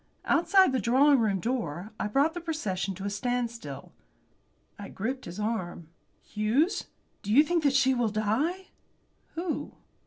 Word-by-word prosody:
Outside 380 0 +4
the 260 - 0
drawing 270 +4 +4
room 205 -4 +1
door 215 - -3
I - - -1
brought 280 +9 +2
the 350 - -5
procession 200 - -3
to 190 - -8
a - - -1
standstill. 235 +2 -4 0.9
I 200 - -7
gripped 255 +6 -4
his 175 +4 -8
arm. 185 -7 -3 0.3
"Hughes, 230 - 0 0.4
do 205 - -4
you 280 +7 +7
think 340 +1 0
that 280 -2 +3
she 265 -1 +4
will 240 -3 +1
die?" 240 - -1 0.7
"Who?" 335 0 -4
240 Hz, 150 wpm, -28 LUFS, 210-295 Hz, 0.9 s, you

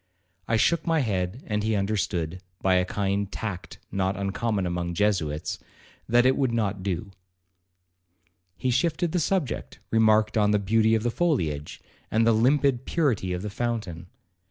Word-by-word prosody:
I 115 - +2
shook 165 +8 +2
my 165 -2 +3
head, 95 0 -2
and 105 -1 -1
he 110 +1 0
understood, 95 -4 -1 0.2
by 95 - +2
a 90 0 +3
kind 100 +1 -1
of - - -27
tact 105 -5 -5
not 95 0 0
uncommon 100 +1 -1
among 85 0 -2
Jesuits, 85 -7 0 0.5
that 120 +1 +4
it 130 +1 +4
would 130 -3 +1
not 105 -4 -1
do. 95 +1 -3 1.5
He 130 0 0
shifted 160 +5 +1
the 180 - +1
subject, 165 - -1
remarked 110 -1 +3
on 105 -1 +3
the 105 - +3
beauty 110 +2 +3
of 110 - -1
the 120 - 0
foliage, 80 - -1 0.3
and 110 +1 +2
the 115 - +5
limpid 130 +2 +2
purity 125 - 0
of 90 +1 -3
the 105 - -4
fountain. 105 -7 -3
105 Hz, 160 wpm, -26 LUFS, 95-120 Hz, 1.5 s, the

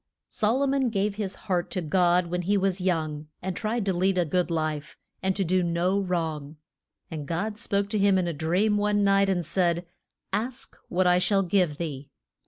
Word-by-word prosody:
SOL 235 +5 +1
O - - +3
MON 270 -2 +1
gave 205 -1 0
his 200 -3 -2
heart 180 -2 0
to - - -2
God 175 +1 +2
when 180 +1 -2
he 200 +4 +1
was 190 -1 0
young, 155 -4 -1
and 185 0 -4
tried 220 0 -2
to 195 - +1
lead 185 +2 +1
a 175 - +2
good 180 +3 0
life, 155 -2 -3 0.2
and 190 0 0
to 195 - 0
do 185 +1 +2
no 175 +3 +1
wrong. 160 -5 -3 0.5
And 150 -3 -5
God 205 +6 -2
spoke 200 -4 0
to 210 - 0
him 200 -1 +4
in 180 -2 0
a 170 - -2
dream 180 +8 +1
one 205 0 +2
night 195 0 +4
and 175 -3 0
said, 175 0 +1 0.5
Ask 240 +5 -2
what 185 +1 +1
I 180 0 +5
shall 195 +1 +2
give 180 -5 +1
thee. 145 -4 -5
185 Hz, 200 wpm, -26 LUFS, 170-200 Hz, 0.5 s, I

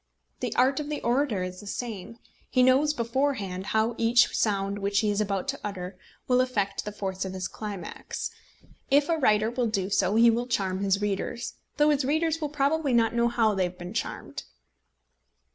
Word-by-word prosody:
The - - -2
art 265 +3 +3
of 300 0 -4
the 300 - -2
orator 240 -5 +1
is 185 0 -6
the 205 - -11
same. 225 -1 -5 0.3
He 255 - +3
knows 265 +4 +4
beforehand 230 -7 -1
how 220 +2 +1
each 230 +1 +4
sound 200 -1 0
which 200 +1 +1
he 210 -2 +1
is 205 +1 0
about 195 -3 -1
to - - -2
utter 185 -2 -5 0.3
will 250 0 +4
affect 205 -7 -1
the 210 - -4
force 190 -2 -4
of 190 -1 -5
his 185 -1 -3
climax. 200 -5 -6 0.6
If 285 +2 +4
a 330 - +2
writer 215 -4 +3
will 245 -1 0
do 200 -3 -1
so 195 +1 +2
he 230 +1 +7
will 240 +2 -1
charm 190 -6 -1
his 195 0 +1
readers, 205 +4 -2 0.2
though 295 0 +5
his 290 -1 +1
readers 315 +3 0
will 300 - -1
probably 290 0 +1
not 230 -1 +3
know 235 0 +3
how 225 -2 +2
they 190 -2 +1
have 180 0 -6
been 175 +2 -7
charmed. 230 - -4
225 Hz, 195 wpm, -27 LUFS, 195-255 Hz, 0.6 s, he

